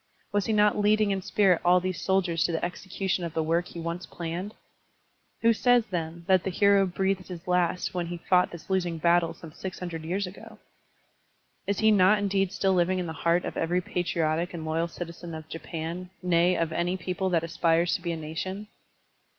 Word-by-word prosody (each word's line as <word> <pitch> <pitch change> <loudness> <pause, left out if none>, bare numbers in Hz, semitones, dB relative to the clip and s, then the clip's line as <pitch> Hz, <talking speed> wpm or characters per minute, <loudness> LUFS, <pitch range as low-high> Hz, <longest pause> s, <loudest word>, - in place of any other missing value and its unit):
Was 205 -1 0
he - - +1
not 210 0 +3
leading 210 0 +3
in 195 -1 -1
spirit 185 -2 +3
all 180 +1 +5
these 185 -2 -3
soldiers 180 -4 +1
to - - 0
the 165 +1 -1
execution 190 +1 -3
of 170 -2 -5
the 160 - +1
work 170 +3 0
he 170 - -9
once 170 +2 -4
planned? 175 +5 -5 0.9
Who 230 0 +6
says, 245 0 +3
then, 170 -1 -4
that 185 -1 +3
the - - -1
hero 200 +1 +4
breathed 190 +1 -1
his 180 -1 -9
last 180 0 +1
when 175 -2 -2
he 175 0 -5
fought 180 +1 +2
this 170 - -11
losing 180 -3 0
battle 170 +1 +2
some 165 - -11
six 185 +3 -7
hundred 170 -3 -5
years 185 +5 -1
ago? 180 +3 -11 1.1
Is 200 +1 0
he 220 0 +5
not 200 0 +5
indeed 195 -2 0
still 195 -1 +1
living 180 +1 +2
in 180 - -2
the 160 - -5
heart 170 +2 +1
of - - -5
every 175 +2 +1
patriotic 175 -2 -1
and 160 -2 -5
loyal 165 +2 0
citizen 170 -1 -7
of 155 -1 -8
Japan, 165 +2 -6
nay, 175 0 +3
of 165 -1 0
any 175 +2 0
people 185 +1 -2
that 170 -3 +1
aspires 165 +1 +1
to - - -1
be 170 -1 -2
a 165 - -3
nation? 185 +7 -5
180 Hz, 200 wpm, -27 LUFS, 170-190 Hz, 1.1 s, Who